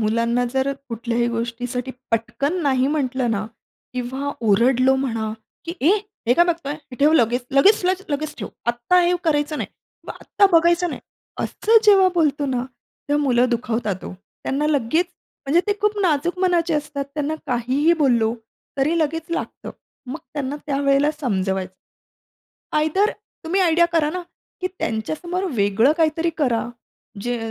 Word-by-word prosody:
मुलांना 230 +3 +1
जर 265 +1 +1 0.2
कुठल्याही 235 0 -1
गोष्टीसाठी 245 +2 -3 0.2
पटकन 275 +9 -1
नाही 265 -3 +2
म्हटलं 260 -4 0
ना 215 -1 -1 0.5
किंवा 260 +3 -3 0.2
ओरडलो 255 +5 +4
म्हणा, 225 -5 -2 0.3
की 335 - -4
"ए 305 - +4 0.4
हे 245 - +4
काय 345 - +5
बघतोय? 335 -5 -2
हे 285 -4 -13
ठेव 295 +2 +5
लगेच, 245 -4 +2
लगेच, 380 +9 +5 0.3
लगेच 300 +1 -2
ठेव. - - -5 0.2
आत्ता 240 +9 +2
हे 350 0 +3
करायचं 300 -1 +1
नाही, - - -3 0.4
ब - - -6
आत्ता 400 - +3
बघायचं 345 +1 +4
नाही." - - -6 0.4
असं 450 +1 +3
जेव्हा 390 -3 +6
बोलतो 295 -4 +1
ना, 255 -2 -1 0.4
तेव्हा 290 0 +2
मुलं 250 -2 +3
दुखावतात 225 -5 -2
हो. - - -6
त्यांना 270 +9 -4
लगेच 305 +4 +1 0.4
म्हणजे 325 +6 +4
ते 410 - +3
खूप 420 0 +1
नाजूक 345 +1 +1
मनाचे 350 -3 +2
असतात. 295 -1 -2
त्यांना 300 +1 -1
काहीही 255 +6 +2
बोललो 235 -4 +3 0.4
तरी 305 +5 +2
लगेच 325 +1 -1
लागतं. 335 - -4 0.4
मग 270 +6 -4 0.2
त्यांना 285 -1 -3
त्यावेळेला 280 0 +2
समजवायचं. 190 -6 -1 1.0
आयदर 315 +8 +2 0.3
तुम्ही 360 +4 +1
आयडिया 340 -1 +4
करा 310 -3 +2
ना, 360 +2 -4 0.4
की 370 - 0
त्यांच्यासमोर 315 - -3
वेगळं 210 +5 +3
काहीतरी 325 0 +1
करा. 245 -6 +1 0.5
जे 245 0 -1
280 Hz, 145 wpm, -22 LUFS, 240-325 Hz, 1.0 s, जेव्हा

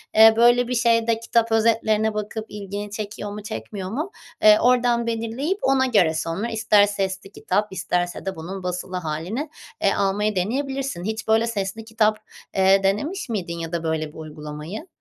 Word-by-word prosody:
eee, 220 0 +9
böyle 240 +1 +5
bir 250 - -1
şeyde 230 -1 +2
kitap 230 0 +1
özetlerine 220 -1 +2
bakıp 215 +1 -4
ilgini 205 0 -6
çekiyor 210 0 -5
mu, 210 0 -7
çekmiyor 205 -3 -6
mu, 305 - -3 0.3
eee, 215 0 +7
oradan 245 -1 +3
belirleyip 230 +10 -2
ona 265 -1 +3
göre 200 -10 +3
sonra 165 +7 -2
ister 220 -2 +4
sesli 195 -1 -3
kitap 205 +1 -1
isterse 175 0 -2
de 190 - -3
bunun 185 +4 -7
basılı 180 +1 -4
hâlini, 180 - -3 0.3
eee, - - +3
almayı 205 +1 0
deneyebilirsin. 265 +1 -2
Hiç, 220 +1 -4
böyle, 220 +1 +3
sesli 215 0 -3
kitap, 220 -1 +2 0.4
eee, 195 0 +4
denemiş 245 - -1
miydin 175 -6 -3
ya 165 -1 -5
da 170 -1 -2
böyle 160 -1 -1
bir - - -15
uygulamayı? 155 - -7
210 Hz, 165 wpm, -23 LUFS, 190-230 Hz, 0.4 s, eee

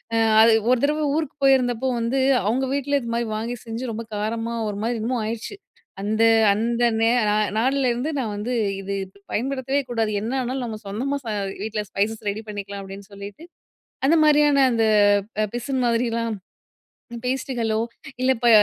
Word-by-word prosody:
அ - - +3 0.2
அது 230 - +7 0.2
ஒரு 255 - +5
தடவ 300 +1 +1
ஊருக்கு 310 -3 -2
போயிருந்தப்போ 260 -2 +3
வந்து 235 +4 0 0.3
அவுங்க 255 +5 +1
வீட்ல 285 0 +1
இதுமாதிரி 235 0 -2
வாங்கி 230 +3 -3
செஞ்சு 230 +2 -4
ரொம்ப 225 +1 -5
காரமா 225 +2 -2
ஒருமாரி 215 +4 -2
என்னமோ 240 +3 -1
ஆயிருச்சு. 230 - -4 0.5
அந்த 215 +3 +1 0.3
அந்த 235 +3 0 0.2
நே 225 - +4 0.2
நா - - +2 0.2
நாள்லருந்து, 260 +3 +1
நான் 225 -5 -2
வந்து, 225 +5 -3 0.3
"இது 200 +1 -4 0.4
பயன்படுத்தவே 265 +3 -1
கூடாது. 225 -3 0
என்ன 230 +4 -3
ஆனாலும் 255 +1 -3
நம்ம 220 -2 -6
சொந்தமா 255 +8 -2
ச - - -7 0.4
வீட்ல 215 -1 -3
ஸ்பைசஸ் 215 +2 -2
ரெடி 215 +2 -4
பண்ணிக்கலாம்" 200 -1 -6
அப்பிடின்னு 195 +1 -10
சொல்லிட்டு, 200 +10 -9 0.6
அந்தமாரியான 295 -3 +5
அந்த 225 -1 +2 0.6
அ - - +1
பிசின் 255 +1 -2
மாதிரிலாம் 230 -1 0 0.9
பேஸ்ட்டுகளோ, 245 -4 -1 0.4
இல்ல 260 - +2
இப்ப 240 0 +2
235 Hz, 150 wpm, -23 LUFS, 220-265 Hz, 0.9 s, அது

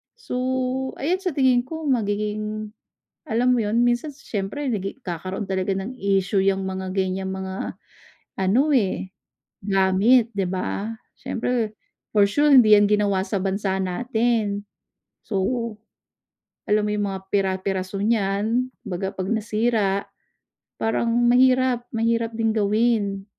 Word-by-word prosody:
So, 355 - -5 0.6
ayan 350 +7 0
sa 360 -6 -2
tingin 260 -3 +4
ko 320 +1 -6
magiging, 215 -3 -1 0.6
alam 245 +2 +2
mo 245 - +2
yun 220 +3 +1
minsan 240 +5 +1
si - - -20
siyempre 205 +8 -3
nagi 195 +3 -3
nagkakaroon 185 -1 -5
talaga 190 0 -1
ng 195 +7 -4
issue 195 0 +1
yang 195 0 +1
mga 190 0 -4
ganyang 190 0 -1
mga 190 0 -5 0.6
ano 195 +8 +3
eh, 195 -5 +1 0.6
gamit, 200 +5 +4
'di 195 -3 -1
ba? 195 +4 -3 0.2
Siyempre, 230 -2 -2 0.4
for 205 -1 +5
sure, 290 +5 +3
hindi 215 -5 +8
'yan 205 - +5
ginawa 200 -2 +1
sa 200 -3 -2
bansa 195 0 -1
natin. 220 +1 0 0.6
So, 200 -3 -2 1.3
alam 210 0 +3
mo 210 - -1
yung 205 -1 0
mga 190 -1 -4
pira-piraso 190 0 -1
niyan, 220 +3 +1 0.2
kumbaga 190 0 -4
'pag 190 0 -3
nasira, 215 -2 0 0.7
parang 225 +1 0 0.2
mahirap, 255 0 +3
mahirap 230 0 0
din 225 -1 +1
gawin. 210 -2 +1
210 Hz, 130 wpm, -23 LUFS, 195-235 Hz, 1.3 s, hindi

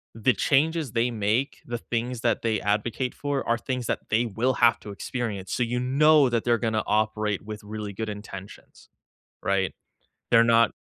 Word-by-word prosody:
the 115 +3 +3
changes 150 - +1
they 120 +1 +1
make, 110 +5 -1
the 120 -1 -3
things 120 +1 -3
that 115 - +1
they 110 -3 0
advocate 110 +5 -1
for 145 -3 -3
are 115 - +2
things 125 0 -3
that - - 0
they 115 +3 +2
will 120 +4 0
have 120 -1 +4
to 105 - -9
experience, 100 -2 -4
so 125 - +1
you 120 +1 -1
know 145 +2 +5
that 115 -2 -1
they're 120 -1 +3
gonna 110 -1 0
operate 105 -1 0
with 105 0 -7
really 105 -1 -5
good 110 +3 -4
intentions, 105 -2 -10 0.5
right? 95 0 0 0.6
They're 115 0 +7
not 115 -1 +4
115 Hz, 175 wpm, -26 LUFS, 105-125 Hz, 0.6 s, They're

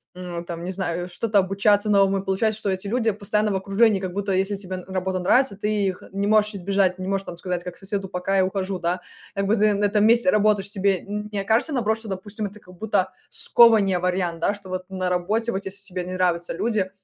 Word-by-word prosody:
м, 175 -2 -6
там, 170 -1 -7
не 180 - -3
знаю, 175 -2 -3
что-то 210 +4 -1
обучаться 200 +2 +3
новому. 195 -1 +3
И 195 - -5
получается, 215 +3 0
что 205 - -2
эти 190 +1 -4
люди 225 +1 +1
постоянно 210 +1 0
в - - -1
окружении, 195 +2 +2
как 185 -1 -4
будто, 200 +1 -3
если 195 +2 +1
тебе 190 -2 -5
работа 190 0 -2
нравится, 245 +5 +3
ты 210 +2 -2 0.2
их 185 -1 -2
не 200 +1 -2
можешь 210 0 +3
избежать, 195 -1 +1
не 185 0 -5
можешь 195 0 -1
там 170 - -8
сказать, 175 0 -3
как 180 -1 -8
соседу: 195 -1 -2
"Пока, 180 +2 -2
я 190 - +4
ухожу", 190 0 -2
да. 175 +1 -1 0.3
Как 200 - 0
бы 205 +3 +2
ты 210 -1 +3
на 205 +1 +1
этом 205 0 +2
месте 235 +4 +5
работаешь 210 -2 +2
себе. 195 -2 +1
Н 210 +1 -5
не 205 - -2
окажется, 220 +10 +1
наоборот, 220 -4 0
что, 225 - -9
допустим, 205 +2 -4
это 205 +2 -13
как 180 -2 -16
будто 190 -1 0 0.2
скованнее, 210 -6 +5
вариант, 180 -2 -1
да? 200 +5 +1
Что 200 -2 -11
вот 185 0 -5
на 185 -1 -2
работе, 210 +6 0
вот 195 -2 -3
если 200 +1 -6
тебе 185 -2 -4
не 185 +1 -6
нравятся 175 -2 0
люди, 205 0 -1
195 Hz, 230 wpm, -23 LUFS, 185-210 Hz, 0.3 s, месте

